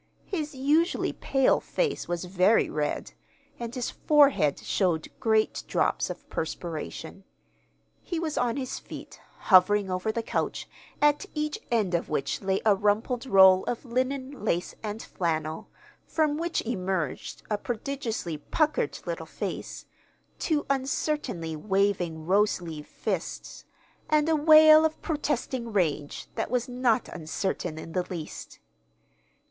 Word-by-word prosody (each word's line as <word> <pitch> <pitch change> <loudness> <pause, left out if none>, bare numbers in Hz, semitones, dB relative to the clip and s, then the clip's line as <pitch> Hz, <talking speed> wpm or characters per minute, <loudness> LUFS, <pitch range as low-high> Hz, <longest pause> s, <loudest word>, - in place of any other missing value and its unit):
His 305 -6 -4
usually 295 +6 +2
pale 270 -1 +2
face 470 -4 -2
was 175 +1 -2
very 185 +4 +3
red, 150 -1 -2 0.5
and 235 +1 -5
his 250 -2 -2
forehead 280 - +4
showed 175 -5 0
great 220 -1 +1
drops - - +1
of - - -8
perspiration. 165 +2 -5 0.8
He 345 -3 -3
was 320 -2 -2
on 245 +1 0
his 260 -2 -4
feet, - - -10 0.2
hovering 190 +1 +5
over 185 +4 -1
the 230 +1 -3
couch, - - -2 0.4
at 295 +6 +3
each 300 0 -2
end 215 -6 +1
of 170 - 0
which 140 -2 -1
lay 190 -1 0
a 215 - +6
rumpled 215 +6 0
roll 190 -4 +7
of 245 +2 -3
linen, 260 +1 -2
lace, 180 -4 0
and 215 0 -5
flannel, 160 -2 -3 0.4
from 310 -2 +1
which 335 +2 -1
emerged 185 - -3
a 210 - +1
prodigiously 230 - -3
puckered 310 - 0
little - - -4
face, - - -5 0.5
two 305 -3 0
uncertainly 265 - -1
waving 185 -3 0
rose 205 +4 +3
leaf 160 -4 -8
fists, - - -4 0.4
and 305 0 +3
a 325 - +3
wail 310 0 +8
of 315 0 0
protesting 265 -6 -2
rage 155 -7 -1
that - - -2
was 245 0 0
not 250 -2 +1
uncertain 170 0 -3
in 160 +1 -8
the 180 - 0
least. 165 -4 -7
220 Hz, 130 wpm, -27 LUFS, 180-280 Hz, 0.8 s, wail